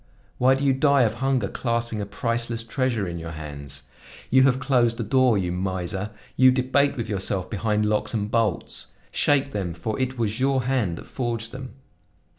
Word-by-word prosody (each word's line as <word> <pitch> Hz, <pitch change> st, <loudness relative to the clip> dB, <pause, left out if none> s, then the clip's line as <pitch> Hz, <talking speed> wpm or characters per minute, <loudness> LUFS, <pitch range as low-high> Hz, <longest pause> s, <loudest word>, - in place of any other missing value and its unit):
Why 130 Hz, +1 st, +5 dB
do 135 Hz, -, -3 dB
you 135 Hz, -, +4 dB
die 140 Hz, 0 st, +4 dB
of 110 Hz, -2 st, +1 dB
hunger 135 Hz, -6 st, +1 dB
clasping 115 Hz, -1 st, -2 dB
a 100 Hz, -, -4 dB
priceless 115 Hz, +2 st, -2 dB
treasure 115 Hz, -4 st, -1 dB
in 85 Hz, -1 st, -4 dB
your 80 Hz, 0 st, -6 dB
hands? 70 Hz, -3 st, -7 dB, 0.5 s
You 130 Hz, +1 st, +6 dB
have 130 Hz, -1 st, +3 dB
closed 125 Hz, -3 st, +2 dB
the 115 Hz, -, -2 dB
door, 125 Hz, 0 st, +3 dB
you 90 Hz, -3 st, -1 dB
miser; 95 Hz, +2 st, -2 dB, 0.3 s
you 130 Hz, 0 st, +7 dB
debate 130 Hz, +2 st, +2 dB
with 115 Hz, -, -3 dB
yourself 95 Hz, -2 st, -2 dB
behind 105 Hz, 0 st, 0 dB
locks 105 Hz, 0 st, 0 dB
and 105 Hz, -2 st, -2 dB
bolts. 115 Hz, -5 st, 0 dB, 0.2 s
Shake 140 Hz, -1 st, +2 dB
them, 90 Hz, -5 st, -3 dB
for 105 Hz, +7 st, -3 dB
it 130 Hz, 0 st, -1 dB
was 110 Hz, -1 st, -1 dB
your 135 Hz, -1 st, +2 dB
hand 120 Hz, -10 st, 0 dB
that -, -, -9 dB
forged 115 Hz, -2 st, -3 dB
them. 130 Hz, -1 st, -8 dB
115 Hz, 185 wpm, -24 LUFS, 100-130 Hz, 0.5 s, you